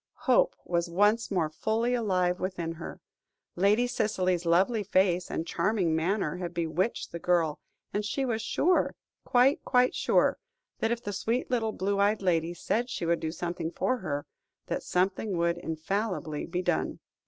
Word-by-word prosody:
Hope - - +4
was 170 0 0
once 205 +6 +2
more 180 -5 +1
fully 225 +8 0
alive 185 -6 +1
within 180 -3 -3
her. 165 0 -8 0.6
Lady 205 +6 +3
Cicely's 185 -7 0
lovely 195 +7 +3
face 185 -2 +2
and 165 - -2
charming 175 -2 +1
manner 175 0 0
had 175 -1 -5
bewitched 170 +6 -1
the 170 - -5
girl, 170 -3 +1 0.3
and 205 - 0
she 265 +6 -1
was 225 -3 -1
sure 350 +10 +1 0.3
quite, 255 +4 +3
quite 250 0 +3
sure - - +2 0.4
that 225 - +1
if 235 0 -2
the 205 - -4
sweet 230 +6 -1
little 225 -3 +1
blue 200 0 -1
eyed 205 +1 +2
lady 170 -1 +1
said 240 +7 -1
she 210 - -3
would 170 0 +2
do 160 - -3
something 170 0 -3
for 255 +8 0
her, 145 -9 -3 0.4
that - - -2
something 190 +1 0
would 170 0 +1
infallibly 160 -1 -3
be 180 +1 -2
done. 175 -2 0
185 Hz, 165 wpm, -29 LUFS, 170-220 Hz, 0.6 s, Hope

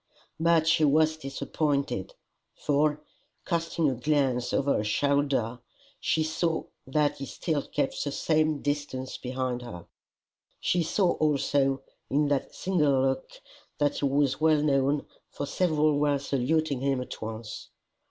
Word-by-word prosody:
But 165 -1 +4
she 165 -1 +3
was 155 +2 +4
disappointed, 145 - -2 0.4
for, 150 +1 +1 0.4
casting 165 -1 0
a 135 - +2
glance 130 -1 +1
over 140 +1 +2
her - - 0
shoulder, 135 0 +1 0.4
she 160 - +1
saw 160 +1 -1 0.2
that 145 +1 +1
he 135 - -5
still 155 -4 -2
kept 145 -2 -1
the 145 - -2
same 155 -1 +1
distance 145 -3 -3
behind 125 -1 -3
her. 95 -9 -9 0.7
She 175 - +1
saw 175 +2 +2
also, 140 -2 +1 0.3
in 145 +1 +2
that 140 -2 -1
single 150 -8 +2
look, 130 0 0 0.5
that 145 -1 +1
he - - 0
was 140 0 +1
well 155 -2 +4
known, 140 0 +2 0.2
for 145 - -4
several 155 -3 +2
were 145 -1 +2
saluting 140 +1 0
him 135 0 0
at 125 - -7
once. 110 0 -6
145 Hz, 135 wpm, -28 LUFS, 135-155 Hz, 0.7 s, But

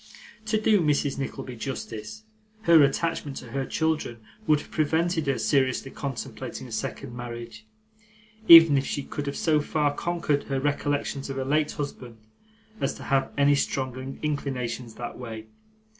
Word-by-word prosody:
To 215 0 +2
do 215 -2 +4
Mrs. 145 -3 +1
Nickleby 135 -2 -5
justice, 130 - -6 0.4
her 170 -5 +7
attachment 145 0 0
to 120 - -9
her 135 +1 -2
children 160 -7 -1 0.3
would 150 -1 +4
have - - -15
prevented 160 +1 +1
her 135 - +1
seriously 135 -1 +1
contemplating 135 -4 -6
a - - -12
second 130 -3 -4
marriage, 120 -2 -8 0.8
even 165 -4 +10
if 135 - -3
she 145 - -2
could 145 +1 -5
have 140 - -3
so 155 -2 +2
far 150 -1 0
conquered 165 -3 -1
her 135 -1 -1
recollections 145 0 -1
of 135 - -4
her 135 - -2
late 150 +2 +1
husband 125 -5 -6 0.6
as - - -1
to - - -10
have 135 -1 +1
any 140 0 +5
strong 130 -1 -2
inclinations 130 -5 -3
that 120 0 -7
way. 110 -3 -7
140 Hz, 155 wpm, -26 LUFS, 130-150 Hz, 0.8 s, even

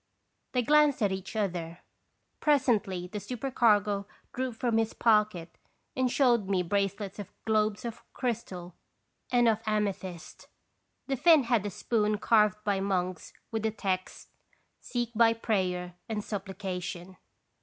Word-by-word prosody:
They 250 -1 +2
glanced 295 -2 +4
at 200 - +2
each 190 +2 -5
other. 175 -5 -2 0.6
Presently 220 - +2
the 210 +4 -5
supercargo 210 -5 +1 0.3
drew 255 0 -2
from 225 0 0
his 225 0 -1
pocket 210 -7 +2 0.4
and 260 -1 +1
showed 240 -6 +3
me 185 -2 +2
bracelets 200 +2 -2
of 205 - -7
globes 215 +1 +1
of 230 -1 -6
crystal 205 -8 -4 0.6
and 240 -1 +4
of 220 -2 +3
ame 210 -2 +1
thyst. 180 -3 -10 0.6
The 270 - -1
Finn 320 0 +6
had 230 -4 +1
a - - -2
spoon 210 +1 0
carved 210 -1 +3
by 200 -2 +1
monks 185 -2 -2 0.2
with 225 -1 -1
the 220 - +1
text: 190 -3 -3 0.5
"Seek 240 -1 -3
by 225 0 +5
prayer 185 -6 -1 0.2
and 215 -2 -2
supplica 190 -2 -4
tion." 180 +1 -7
210 Hz, 140 wpm, -29 LUFS, 190-235 Hz, 0.6 s, Finn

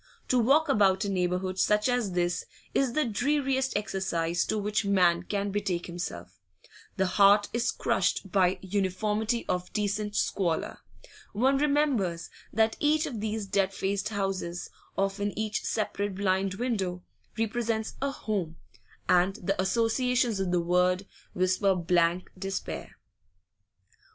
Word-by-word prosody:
To 255 - +4
walk 280 +7 +4
about 200 -6 +3
a - - -1
neighbourhood 185 0 -1
such 210 +2 +3
as 245 -6 0
this 175 0 0 0.3
is 265 -3 +1
the 305 - +2
dreariest 265 +2 0
exercise 175 -4 -1
to 220 - -1
which 210 +1 0
man 180 -4 +3
can 200 +2 -2
betake 195 -4 -1
himself; 175 0 -6 0.6
the 190 - +2
heart 200 +2 +5
is 235 +1 +1
crushed 195 - 0
by 185 -1 +3
uniformity 210 +4 -1
of 180 0 -2
decent 210 0 -1
squalor; 170 -5 -1 0.5
one 265 +6 +2
remembers 275 - +1 0.2
that 220 +1 +2
each 305 +2 +2
of 255 -8 -5
these 215 -1 -2
dead 195 0 0
faced 195 +1 -1
houses, 195 -4 -3 0.3
often 195 +1 -1
each 215 -1 -2
separate 205 -2 -2
blind 190 -1 0
window, 195 -6 -2 0.3
represents 225 0 -1
a 275 - +1
'home,' 200 -11 -3 0.5
and 180 +2 +3
the 190 +1 -1
associations 230 +3 +1
of 190 -1 -1
the 175 0 +2
word 180 +2 +2 0.3
whisper 185 +2 +2
blank 175 0 +1
despair. 195 +1 -5
200 Hz, 130 wpm, -28 LUFS, 185-220 Hz, 0.6 s, heart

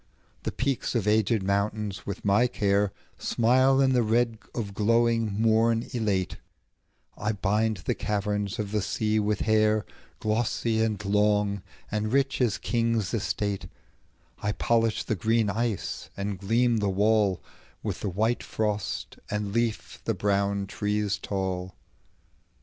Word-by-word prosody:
The - - -3
peaks 130 -1 -1
of 110 -3 0
aged 110 0 +3
mountains, 100 +1 -1
with 100 0 -5
my 100 +5 +4
careSmile 115 +6 +2
in 130 -1 +3
the 125 - +4
red 115 0 +1 0.2
of 105 -4 -3
glowing 115 0 +2
morn 115 +1 +3
elate;I 105 0 -4
bind 105 +2 +1
the - - +1
caverns 105 0 -2
of 105 -3 -3
the 105 -1 +1
sea 110 +2 0
with 105 0 0
hair, 110 -1 +3 0.3
Glossy, 110 +1 0
and 105 -2 -1
long, 105 0 +2 0.3
and 105 +1 -1
rich 135 0 +1
as 120 -5 +2
kings' 115 -4 0
estate;I 105 0 -4
polish 115 -1 +1
the - - -1
green 110 +2 +1
ice, 115 -1 -2
and 100 -1 -3
gleam 115 +4 +2
the 105 -2 0
wallWith 100 -2 -1
the 105 - -2
white 110 +6 0
frost, 105 -2 -3
and 105 -1 -2
leaf 105 -8 -1
the - - 0
brown 100 0 +1
trees 105 0 -1
tall. 95 -2 -3
105 Hz, 125 wpm, -27 LUFS, 100-115 Hz, 0.3 s, my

